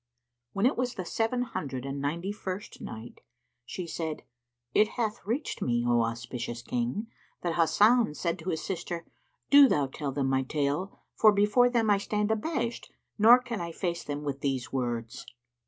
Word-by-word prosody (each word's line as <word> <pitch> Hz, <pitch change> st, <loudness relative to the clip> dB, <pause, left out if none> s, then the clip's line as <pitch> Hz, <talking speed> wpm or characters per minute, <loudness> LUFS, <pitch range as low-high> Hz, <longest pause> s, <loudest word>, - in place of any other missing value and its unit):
When 200 Hz, +3 st, +1 dB
it 260 Hz, -, +3 dB
was 250 Hz, 0 st, -1 dB
the 185 Hz, -, -4 dB
Seven 225 Hz, +7 st, 0 dB
Hundred 135 Hz, -, -5 dB
and 140 Hz, 0 st, -4 dB
Ninety 170 Hz, +7 st, -2 dB
first 200 Hz, -1 st, -6 dB
Night, 110 Hz, +2 st, -9 dB, 0.5 s
She 180 Hz, -, -5 dB
said, 160 Hz, -2 st, -4 dB, 0.5 s
It 215 Hz, -, +5 dB
hath 220 Hz, -3 st, -1 dB
reached 250 Hz, +8 st, -2 dB
me, 120 Hz, -1 st, +1 dB
O 120 Hz, -1 st, +4 dB
auspicious 120 Hz, +1 st, -4 dB
King, 125 Hz, -, -2 dB, 0.4 s
that 170 Hz, -2 st, 0 dB
Hasan 205 Hz, +3 st, +4 dB
said 170 Hz, +1 st, -2 dB
to 170 Hz, +3 st, -5 dB
his 160 Hz, -, -2 dB
sister, 175 Hz, -2 st, -4 dB, 0.5 s
"Do 280 Hz, -1 st, +9 dB
thou 145 Hz, -, +2 dB
tell 140 Hz, +1 st, -4 dB
them 135 Hz, 0 st, -1 dB
my 135 Hz, 0 st, +2 dB
tale, 145 Hz, +7 st, -2 dB
for 215 Hz, -, +6 dB
before 210 Hz, +5 st, +4 dB
them 230 Hz, -3 st, +2 dB
I 200 Hz, -, +4 dB
stand 210 Hz, +1 st, -1 dB
abashed 235 Hz, 0 st, -2 dB, 0.3 s
nor 230 Hz, +4 st, +9 dB
can 240 Hz, -5 st, -5 dB
I 170 Hz, -1 st, -4 dB
face 170 Hz, 0 st, -3 dB
them 145 Hz, 0 st, -4 dB
with 140 Hz, -2 st, -3 dB
these 135 Hz, -1 st, -2 dB
words." 120 Hz, -3 st, -3 dB
170 Hz, 170 wpm, -29 LUFS, 135-215 Hz, 0.5 s, Do